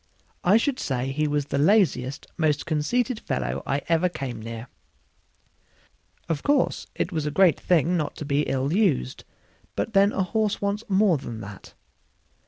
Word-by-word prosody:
I 195 Hz, +4 st, +5 dB
should 260 Hz, +2 st, 0 dB
say 130 Hz, -1 st, -2 dB
he 150 Hz, +2 st, 0 dB
was 145 Hz, -1 st, 0 dB
the 140 Hz, -, -2 dB
laziest, 145 Hz, -, +2 dB
most 155 Hz, -3 st, +1 dB
conceited 215 Hz, -, 0 dB
fellow 65 Hz, +2 st, -3 dB
I 140 Hz, +1 st, -1 dB
ever 170 Hz, +2 st, +2 dB
came 130 Hz, -8 st, -5 dB
near. 115 Hz, +2 st, -7 dB, 1.6 s
Of 165 Hz, -4 st, -1 dB
course, 285 Hz, -2 st, +1 dB
it 175 Hz, -, -2 dB
was 155 Hz, -3 st, -2 dB
a -, -, +1 dB
great 165 Hz, 0 st, +4 dB
thing 175 Hz, 0 st, +2 dB
not 150 Hz, -3 st, -2 dB
to 150 Hz, -, -6 dB
be 140 Hz, 0 st, +1 dB
ill 135 Hz, +3 st, 0 dB
used, 175 Hz, -, +1 dB, 0.5 s
but 225 Hz, -, -2 dB
then 200 Hz, +1 st, +5 dB
a 190 Hz, -, 0 dB
horse 215 Hz, +2 st, 0 dB
wants 200 Hz, +2 st, -2 dB
more 190 Hz, -5 st, +3 dB
than 115 Hz, -4 st, -7 dB
that. 100 Hz, -1 st, -11 dB
155 Hz, 165 wpm, -25 LUFS, 135-195 Hz, 1.6 s, I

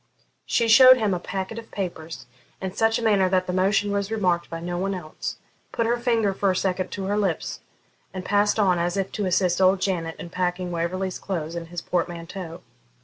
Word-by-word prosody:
She 230 Hz, -, +2 dB
showed 255 Hz, +3 st, +9 dB
him 215 Hz, -5 st, +1 dB
a 180 Hz, -, -1 dB
packet 190 Hz, +5 st, -4 dB
of 230 Hz, -, -12 dB
papers 170 Hz, -4 st, -5 dB, 0.3 s
in 190 Hz, -1 st, -4 dB
such 225 Hz, +2 st, +2 dB
a 235 Hz, -, -4 dB
manner 200 Hz, -4 st, +3 dB
that 185 Hz, 0 st, +2 dB
the 180 Hz, -, -3 dB
motion 195 Hz, +2 st, +2 dB
was 200 Hz, 0 st, -1 dB
remarked 180 Hz, -6 st, 0 dB
by 165 Hz, -, -5 dB
no 175 Hz, +1 st, -4 dB
one 195 Hz, +1 st, -1 dB
else, 155 Hz, -4 st, -6 dB, 0.3 s
put 230 Hz, -, 0 dB
her 235 Hz, +1 st, +2 dB
finger 230 Hz, -4 st, +1 dB
for 195 Hz, +1 st, +1 dB
a 185 Hz, -, +1 dB
second 185 Hz, 0 st, -1 dB
to 195 Hz, -, -4 dB
her 200 Hz, +2 st, 0 dB
lips, 195 Hz, -6 st, -1 dB, 0.5 s
and 185 Hz, 0 st, -6 dB
passed 205 Hz, +1 st, +2 dB
on, 185 Hz, -5 st, +3 dB
as 175 Hz, +2 st, -1 dB
if 195 Hz, -1 st, -1 dB
to 205 Hz, -3 st, -2 dB
assist 180 Hz, 0 st, +2 dB
old 190 Hz, +1 st, +5 dB
Janet 170 Hz, -4 st, -1 dB
in 170 Hz, -, -9 dB
packing 180 Hz, 0 st, -2 dB
Waverley's 180 Hz, +2 st, -2 dB
clothes 165 Hz, -4 st, -4 dB
in 170 Hz, -1 st, -5 dB
his 175 Hz, 0 st, -6 dB
portmanteau. 170 Hz, 0 st, -4 dB
185 Hz, 205 wpm, -24 LUFS, 175-205 Hz, 0.5 s, showed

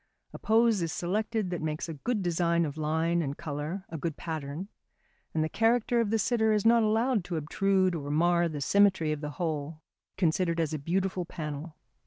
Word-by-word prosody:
A -, -, -8 dB
pose 225 Hz, -2 st, +3 dB
is 165 Hz, -1 st, -1 dB
selected 210 Hz, +3 st, -1 dB
that 175 Hz, -, -3 dB
makes 155 Hz, +1 st, -3 dB
a 165 Hz, -, -5 dB
good 210 Hz, -, -2 dB
design 170 Hz, -1 st, +1 dB
of 145 Hz, -2 st, -5 dB
line 160 Hz, +2 st, 0 dB
and 140 Hz, -2 st, -3 dB
colour 155 Hz, +4 st, -4 dB
a 165 Hz, -, -6 dB
good 160 Hz, 0 st, -3 dB
pattern 160 Hz, +2 st, -5 dB, 0.6 s
and 155 Hz, -, 0 dB
the -, -, 0 dB
character 235 Hz, +5 st, +2 dB
of 220 Hz, -, -1 dB
the 225 Hz, -, +2 dB
sitter 220 Hz, -1 st, +2 dB
is 210 Hz, 0 st, 0 dB
not 230 Hz, 0 st, +6 dB
allowed 220 Hz, 0 st, +2 dB
to 175 Hz, -2 st, -3 dB
obtrude 185 Hz, +4 st, +1 dB
or 145 Hz, -4 st, -4 dB
mar 170 Hz, +3 st, +3 dB
the 150 Hz, -2 st, -5 dB
symmetry 190 Hz, -2 st, +3 dB
of 150 Hz, -1 st, -3 dB
the 150 Hz, -, -4 dB
whole 155 Hz, -2 st, -3 dB, 0.3 s
considered 170 Hz, -1 st, +1 dB
as 160 Hz, -1 st, 0 dB
a 155 Hz, -, -2 dB
beautiful 185 Hz, +4 st, -1 dB
panel. 155 Hz, -2 st, -6 dB
170 Hz, 195 wpm, -29 LUFS, 155-200 Hz, 0.6 s, not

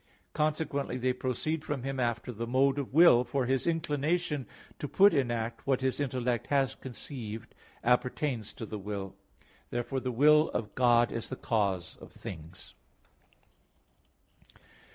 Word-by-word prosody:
Consequently, 150 Hz, -3 st, -1 dB
they 130 Hz, 0 st, +1 dB
proceed 130 Hz, +5 st, -2 dB
from 140 Hz, -5 st, -3 dB
Him 135 Hz, 0 st, -3 dB
after 120 Hz, 0 st, -1 dB
the 115 Hz, 0 st, -5 dB
mode 135 Hz, +3 st, +3 dB
of 140 Hz, -, -4 dB
will, 150 Hz, -5 st, +7 dB
for 125 Hz, +2 st, -1 dB
His 130 Hz, +3 st, 0 dB
inclination 155 Hz, -2 st, 0 dB, 0.3 s
to 145 Hz, -, -3 dB
put 200 Hz, +7 st, +5 dB
in 135 Hz, -5 st, +2 dB
act 115 Hz, +1 st, -3 dB
what 135 Hz, -1 st, +2 dB
His 130 Hz, +1 st, 0 dB
intellect 125 Hz, -4 st, -1 dB
has 140 Hz, -2 st, +2 dB
conceived 120 Hz, -4 st, -7 dB, 0.3 s
appertains 125 Hz, -1 st, 0 dB
to 115 Hz, -, -7 dB
the 105 Hz, 0 st, -6 dB
will. 100 Hz, -1 st, -5 dB, 0.5 s
Therefore 120 Hz, +3 st, -2 dB
the 130 Hz, 0 st, -3 dB
will 150 Hz, +5 st, +5 dB
of 105 Hz, -2 st, -2 dB
God 120 Hz, -2 st, +4 dB
is 115 Hz, -, -4 dB
the 130 Hz, -, -4 dB
cause 100 Hz, -8 st, -1 dB
of -, -, -13 dB
things. 80 Hz, 0 st, -10 dB
130 Hz, 145 wpm, -30 LUFS, 115-145 Hz, 0.5 s, will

